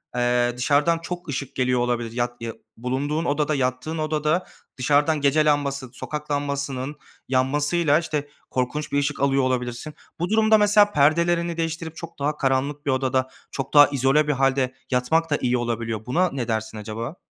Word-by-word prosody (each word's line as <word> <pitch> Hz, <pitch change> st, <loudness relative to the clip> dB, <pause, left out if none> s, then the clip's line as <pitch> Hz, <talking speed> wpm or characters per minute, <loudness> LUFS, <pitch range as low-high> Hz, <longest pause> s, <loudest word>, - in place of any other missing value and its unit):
eee, 120 Hz, 0 st, +2 dB
dışarıdan 145 Hz, +6 st, +2 dB
çok 175 Hz, 0 st, -6 dB
ışık 140 Hz, -1 st, -4 dB
geliyor 125 Hz, -1 st, +1 dB
olabilir. 120 Hz, -2 st, -1 dB
Yat 120 Hz, 0 st, -3 dB
ya 115 Hz, -1 st, -4 dB, 0.2 s
bulunduğun 140 Hz, +7 st, -2 dB
odada, 150 Hz, 0 st, +1 dB
yattığın 130 Hz, +4 st, -2 dB
odada 155 Hz, +2 st, 0 dB, 0.3 s
dışarıdan 145 Hz, +4 st, +2 dB
gece 145 Hz, +2 st, +3 dB
lambası, 140 Hz, -3 st, 0 dB
sokak 150 Hz, +3 st, -6 dB
lambasının 140 Hz, -1 st, -2 dB, 0.3 s
yanmasıyla, 145 Hz, +4 st, +2 dB
işte, 150 Hz, -3 st, -3 dB, 0.2 s
korkunç 130 Hz, +4 st, -2 dB
bir 145 Hz, -, +2 dB
ışık 145 Hz, +1 st, -1 dB
alıyor 135 Hz, 0 st, +2 dB
olabilirsin. 125 Hz, +3 st, -2 dB, 0.3 s
Bu 175 Hz, +2 st, -1 dB
durumda 220 Hz, 0 st, +5 dB
mesela 205 Hz, 0 st, +5 dB
perdelerini 170 Hz, +2 st, +2 dB
değiştirip 165 Hz, 0 st, -3 dB
çok 170 Hz, -1 st, -9 dB
daha 150 Hz, +2 st, -1 dB
karanlık 140 Hz, +2 st, 0 dB
bir 140 Hz, -, +1 dB
odada, 130 Hz, 0 st, 0 dB, 0.2 s
çok 135 Hz, +1 st, -5 dB
daha 145 Hz, 0 st, +9 dB
izole 140 Hz, +2 st, +2 dB
bir 150 Hz, -, +2 dB
hâlde 135 Hz, -1 st, +1 dB, 0.2 s
yatmak 145 Hz, +7 st, +1 dB
da 145 Hz, -, +2 dB
iyi 125 Hz, 0 st, +1 dB
olabiliyor. 115 Hz, -2 st, -3 dB
Buna 175 Hz, +9 st, +2 dB
ne 130 Hz, -4 st, -3 dB
dersin 110 Hz, -1 st, -2 dB
acaba? 110 Hz, -, -5 dB
140 Hz, 165 wpm, -23 LUFS, 125-155 Hz, 0.3 s, daha